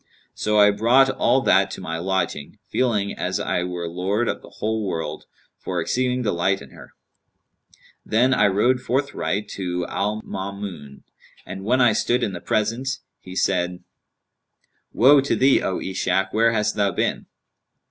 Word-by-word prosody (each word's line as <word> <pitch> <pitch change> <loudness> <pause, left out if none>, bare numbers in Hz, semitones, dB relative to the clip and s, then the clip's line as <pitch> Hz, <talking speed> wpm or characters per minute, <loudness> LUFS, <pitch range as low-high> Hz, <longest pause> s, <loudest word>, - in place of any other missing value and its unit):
So 105 0 0
I 105 0 +7
brought 125 +6 +4
all 135 - +2
that 100 -4 +3
to - - -7
my 80 -3 -4
lodging, 90 -2 -2
feeling 105 -6 0
as - - -2
I 90 - -1
were 90 -1 -4
lord 95 +7 -1
of - - -2
the - - -14
whole 110 0 -2
world, 80 -5 -4 0.3
for 90 -1 -3
exceeding 125 +8 0
delight 95 -1 0
in 70 - -13
her; - - -14 1.1
then 125 +4 +2
I 115 - +4
rode 115 +6 +2
forthright 125 -5 -2
to 90 -2 -3
Al 105 +4 -2
Maamun. 95 -7 -7 0.4
And 95 +1 -7
when 125 +5 +2
I 120 -3 +5
stood 120 +3 +1
in 100 - -1
the 85 - -7
presence, 115 +5 -1 0.2
he 95 0 -11
said, 90 -1 0 1.1
'Woe 135 +4 +6
to 140 - 0
thee, 135 +1 +4
O 95 - -1
Ishak, 95 0 -1
where 115 +1 +3
hast 105 -1 0
thou 100 -1 +2
been?' - - -2
100 Hz, 160 wpm, -22 LUFS, 90-120 Hz, 1.1 s, I